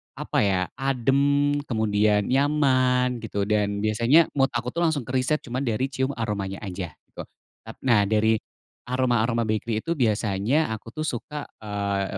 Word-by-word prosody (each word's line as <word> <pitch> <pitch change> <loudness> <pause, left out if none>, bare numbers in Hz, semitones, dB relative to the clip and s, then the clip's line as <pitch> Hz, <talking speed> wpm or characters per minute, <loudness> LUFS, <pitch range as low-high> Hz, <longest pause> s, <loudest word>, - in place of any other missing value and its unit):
apa - - -2
ya, 95 -3 +2 0.2
adem, 140 +2 +2 0.2
kemudian 105 -2 +2
nyaman 130 -2 +2
gitu 105 -3 -3
dan 100 0 0
biasanya 120 +9 +4
mood 135 -1 +2
aku 120 +1 -2
tuh 170 - -4
langsung 150 -5 -1
ke 125 - -8
riset 130 +4 0
cuma 125 +1 -4
dari 130 +1 -1
cium 130 +1 -1
aromanya 105 -4 -3
aja 90 -5 -6
gitu. - - -10 0.4
Tap - - -8
nah, 105 -6 +3
dari 110 +1 +2 0.5
aroma-aroma 120 -2 +1
bakery 110 0 -2
itu 165 - -3
biasanya 110 - +1
aku 110 0 -6
tuh 155 - -2
suka, 150 +1 -4 0.2
eee, 100 -2 -2
120 Hz, 155 wpm, -25 LUFS, 105-135 Hz, 0.5 s, biasanya